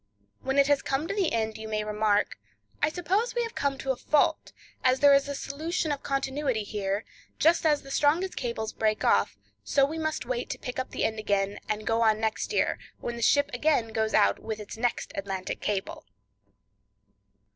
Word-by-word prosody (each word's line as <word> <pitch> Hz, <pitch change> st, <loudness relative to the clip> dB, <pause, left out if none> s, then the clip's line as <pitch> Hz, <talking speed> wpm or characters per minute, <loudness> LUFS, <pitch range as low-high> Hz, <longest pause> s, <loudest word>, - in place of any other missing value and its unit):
When 265 Hz, +1 st, -2 dB
it 280 Hz, -, +6 dB
has 285 Hz, 0 st, +3 dB
come 275 Hz, +4 st, -1 dB
to 400 Hz, -, -2 dB
the 395 Hz, -5 st, +1 dB
end, 220 Hz, -1 st, -1 dB
you 220 Hz, -, -6 dB
may 215 Hz, -1 st, -1 dB
remark: 210 Hz, -, +1 dB, 0.4 s
"I 295 Hz, -, +3 dB
suppose 375 Hz, +9 st, -1 dB
we 480 Hz, -, +1 dB
have 460 Hz, -, -5 dB
come 280 Hz, -1 st, -1 dB
to 270 Hz, -1 st, -1 dB
a -, -, -1 dB
fault, 295 Hz, +4 st, +1 dB, 0.3 s
as 255 Hz, 0 st, +3 dB
there 285 Hz, -1 st, +7 dB
is 275 Hz, 0 st, +4 dB
a 285 Hz, -, -3 dB
'solution 315 Hz, +4 st, -2 dB
of 285 Hz, -, -2 dB
continuity 270 Hz, -4 st, -1 dB
here, 200 Hz, 0 st, -2 dB, 0.3 s
just 330 Hz, 0 st, +4 dB
as 295 Hz, -2 st, +2 dB
the 275 Hz, -, -10 dB
strongest 325 Hz, +7 st, +2 dB
cables 235 Hz, -3 st, -3 dB
break 215 Hz, -1 st, 0 dB
off,' 100 Hz, +1 st, +3 dB, 0.3 s
so 275 Hz, -, +3 dB
we 315 Hz, +3 st, -4 dB
must 315 Hz, -4 st, -2 dB
wait 245 Hz, 0 st, -3 dB
to -, -, -3 dB
pick 250 Hz, +1 st, -5 dB
up 260 Hz, -, -3 dB
the -, -, -3 dB
end 220 Hz, 0 st, 0 dB
again, 200 Hz, -1 st, 0 dB
and 215 Hz, 0 st, -2 dB
go 225 Hz, 0 st, +1 dB
on 220 Hz, -1 st, +4 dB
next 220 Hz, -1 st, -1 dB
year, -, -, +1 dB, 0.2 s
when 240 Hz, -, -4 dB
the 235 Hz, -, -6 dB
ship 285 Hz, +5 st, +3 dB
again 245 Hz, -3 st, +2 dB
goes 220 Hz, 0 st, 0 dB
out 100 Hz, 0 st, +4 dB
with 220 Hz, -1 st, -5 dB
its 210 Hz, -, -8 dB
next 240 Hz, +2 st, -1 dB
Atlantic 195 Hz, -1 st, -4 dB
Cable." 200 Hz, -2 st, -3 dB
255 Hz, 200 wpm, -28 LUFS, 215-290 Hz, 0.4 s, there